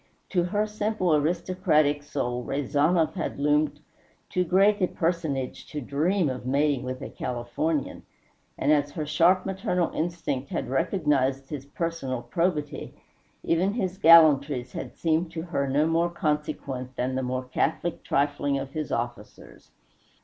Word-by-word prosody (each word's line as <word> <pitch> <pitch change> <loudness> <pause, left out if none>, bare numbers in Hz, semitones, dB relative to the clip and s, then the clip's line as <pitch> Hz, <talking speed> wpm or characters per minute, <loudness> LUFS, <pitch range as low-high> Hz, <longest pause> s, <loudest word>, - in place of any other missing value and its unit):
To 175 -3 +1
her 205 +4 0
simple 210 -4 0
aristocratic 155 -2 +1
soul 125 -4 -3
Rezanov 150 +5 +1
had - - -4
loomed 150 +1 +1 0.5
too 180 - +1
great 195 +4 +3
a 185 - +4
personage 160 -8 -2
to 150 - -5
dream 155 +7 +1
of 130 -2 -4
mating 140 +1 +1
with 130 0 -5
a - - -6
Californian; 125 +5 -2 0.6
and 150 - +2
as 145 -1 +3
her 155 -3 -3
sharp 170 +5 +3
maternal 190 -2 -1
instinct 155 -5 -2
had - - -3
recognized 140 -5 +1
his 140 -2 -6
personal 145 -6 -3
probity, 150 +3 -2 0.5
even 180 +4 +1
his 190 -5 -2
gallantries 150 -6 +6
had - - -7
seemed 165 +1 +1
to 160 -1 -4
her 145 -5 -1
no 145 +3 +2
more 165 +1 +2
consequent 145 -5 -3
than 125 +1 -1
the 130 - -1
more 130 0 -2
catholic 155 +6 -2
trifling 145 0 0
of 135 0 -5
his 155 -2 -4
officers. 120 -3 -6
150 Hz, 140 wpm, -26 LUFS, 135-170 Hz, 0.6 s, gallantries